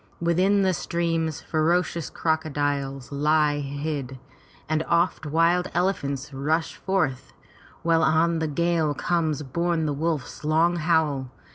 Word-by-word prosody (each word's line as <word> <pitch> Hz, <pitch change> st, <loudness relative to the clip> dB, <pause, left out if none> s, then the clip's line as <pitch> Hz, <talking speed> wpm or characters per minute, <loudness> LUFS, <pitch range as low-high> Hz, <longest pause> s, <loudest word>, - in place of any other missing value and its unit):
Within 185 Hz, +4 st, +2 dB
the 190 Hz, -1 st, +2 dB
streams 165 Hz, -2 st, -1 dB
ferocious 170 Hz, +1 st, 0 dB
crocodiles 145 Hz, -4 st, -2 dB
lie 150 Hz, +1 st, +2 dB
hid, 140 Hz, -2 st, -4 dB, 0.5 s
and 155 Hz, 0 st, +1 dB
oft 170 Hz, -2 st, +1 dB
wild 165 Hz, +4 st, +2 dB
elephants 150 Hz, -6 st, -1 dB
rush 155 Hz, +5 st, -1 dB
forth, 160 Hz, -10 st, -1 dB, 0.5 s
while 165 Hz, -1 st, +3 dB
on 165 Hz, +1 st, +3 dB
the 160 Hz, -, -1 dB
gale 160 Hz, -1 st, +1 dB
comes 155 Hz, -2 st, 0 dB
borne 170 Hz, +3 st, -1 dB
the 150 Hz, -, 0 dB
wolf's 155 Hz, -1 st, -3 dB
long 165 Hz, +3 st, +2 dB
howl. 155 Hz, -5 st, +1 dB
160 Hz, 120 wpm, -25 LUFS, 145-170 Hz, 0.5 s, while